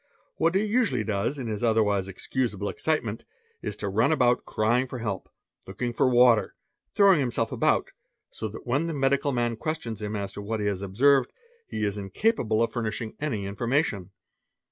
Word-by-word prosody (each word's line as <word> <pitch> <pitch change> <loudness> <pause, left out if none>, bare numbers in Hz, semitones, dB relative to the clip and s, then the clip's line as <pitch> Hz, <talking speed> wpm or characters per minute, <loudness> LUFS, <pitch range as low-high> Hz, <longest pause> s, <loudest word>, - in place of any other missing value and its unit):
What 165 +3 +2
he 195 - +3
usually 225 +2 +1
does 105 +6 -1
in 130 - -5
his 110 0 -3
otherwise 105 -4 +2
excusable 105 +1 -2
excitement, 120 -8 -2 0.4
is 105 - -4
to 105 -1 -4
run 110 +8 +2
about 125 -5 +2
crying 120 +4 +1
fol 130 - -6
help, 105 -5 -4 0.4
looking 120 +6 -3
for 130 - +2
water, 120 -4 +4 0.4
throwing 200 -5 +5
himself 120 -4 -1
about, - - +1 0.4
so 110 - -5
that 110 - -10
when 140 +7 0
the 165 - -3
medi 135 0 +3
cal 140 0 -2
man 120 -2 0
questions 120 -6 -3
him 105 0 -3
as 100 -1 -3
to 100 - -7
what 110 +2 -3
he 105 - -2
has 100 -2 -1
observed, 125 +7 +3 0.4
he 110 - -4
is 105 0 -1
incapable 110 - +1
o} - - +5
furnishing 115 -1 -4
any 120 -10 -2
information. 110 - -1
115 Hz, 180 wpm, -26 LUFS, 105-135 Hz, 0.4 s, throwing